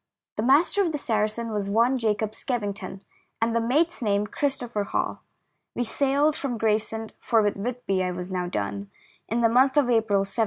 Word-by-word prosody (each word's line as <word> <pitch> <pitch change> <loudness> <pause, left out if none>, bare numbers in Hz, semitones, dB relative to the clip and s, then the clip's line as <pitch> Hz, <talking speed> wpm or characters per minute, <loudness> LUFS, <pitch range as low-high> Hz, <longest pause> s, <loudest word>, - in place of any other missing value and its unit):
The - - -1
master 290 - +4
of 340 - 0
the - - 0
Saracen 225 -3 -1
was 205 -2 -2
one 235 +5 +3
Jacob 215 -1 0
Skevington, 205 -5 -4 0.4
and 230 0 +1
the 230 - +2
mate's 300 +9 +1
name 205 -2 +1
Christopher 245 -3 -2
Hall. 200 - -2 0.5
We 245 - 0
sailed 280 +5 +1
from 260 -6 -3
Gravesend 220 0 -1
— - - -43
for 225 -2 +3
with 205 - +1
Whitby 200 -3 -2
I 180 - -1
was 180 +1 -5
now 180 -1 -2
done 100 - -3 0.2
— - - -32
in 230 +2 0
the 230 - +5
month 260 +4 +4
of 265 -4 +4
April, 220 -4 +3
1796. 195 +4 -4
225 Hz, 195 wpm, -25 LUFS, 205-250 Hz, 0.5 s, the